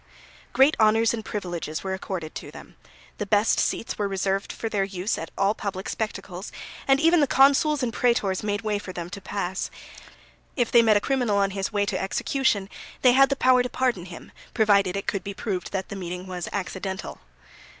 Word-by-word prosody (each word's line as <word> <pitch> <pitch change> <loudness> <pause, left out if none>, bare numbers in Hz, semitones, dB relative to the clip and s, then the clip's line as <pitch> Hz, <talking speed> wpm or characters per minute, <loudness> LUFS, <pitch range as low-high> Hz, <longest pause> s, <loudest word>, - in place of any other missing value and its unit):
Great 270 +4 +5
honours 225 +1 +4
and 225 -2 -4
privileges 175 -7 -4
were 190 -1 -2
accorded 185 -4 -5
to - - -7
them; - - -13 0.4
the 210 - -1
best 210 +2 +3
seats 230 - -1
were 205 - +1
reserved 195 0 -1
for 225 - -4
their 205 -3 0
use 195 +1 -2
at 165 - -6
all 195 +1 +3
public 195 -3 -5
spectacles, 200 -3 -5 0.4
and 270 0 +5
even 330 +2 +5
the 290 - +3
consuls 280 +2 +4
and 235 -2 -1
prætors 215 -6 +1
made 205 0 -1
way 210 -1 0
for 195 - -8
them 175 -1 -6
to 200 0 -7
pass. 190 -1 -3 0.9
If 245 -4 0
they 235 - +7
met 220 -2 +5
a - - 0
criminal 250 -6 +1
on 200 -1 +2
his 195 0 -3
way 205 -1 +1
to 200 -3 -2
execution 200 0 0 0.4
they 250 - +7
had 270 +2 +6
the 275 - +1
power 255 -1 +4
to 250 - -2
pardon 245 -9 0
him, 175 -2 -11 0.2
provided 200 -3 +3
it 200 - -4
could 195 - -2
be 200 0 -6
proved 190 -4 -3
that 190 -1 -3
the - - -5
meeting 180 -1 -5
was 180 -2 -5
accidental. 190 -1 -5
205 Hz, 200 wpm, -25 LUFS, 190-235 Hz, 0.9 s, they